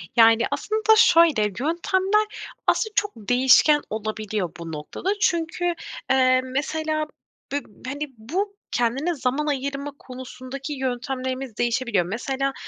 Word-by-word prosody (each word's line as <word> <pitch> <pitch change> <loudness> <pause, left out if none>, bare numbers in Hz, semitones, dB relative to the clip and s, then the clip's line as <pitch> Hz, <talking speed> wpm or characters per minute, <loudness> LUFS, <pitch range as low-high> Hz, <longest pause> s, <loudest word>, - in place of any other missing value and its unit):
Yani 230 0 +6
aslında 435 0 +2
şöyle 335 - +6
yöntemler 350 - +1 0.4
aslında 435 -1 +2
çok 415 0 +1
değişken 255 +6 +5
olabiliyor 215 -3 -3
bu 165 -1 -6
noktada 155 - -5
çünkü, 345 0 +1 0.4
eee, 255 -1 +4
mesela 310 +4 -1 0.5
b 285 - 0
b 215 +5 -11
hani, 290 +2 -3
bu 370 - -3 0.2
kendine 265 +9 0
zaman 270 +2 -1
ayırma 280 0 -2
konusundaki 260 +2 -7
yöntemlerimiz 260 -1 -3
değişebiliyor. 235 -6 +1
Mesela 265 +7 -2
265 Hz, 115 wpm, -24 LUFS, 240-315 Hz, 0.5 s, Yani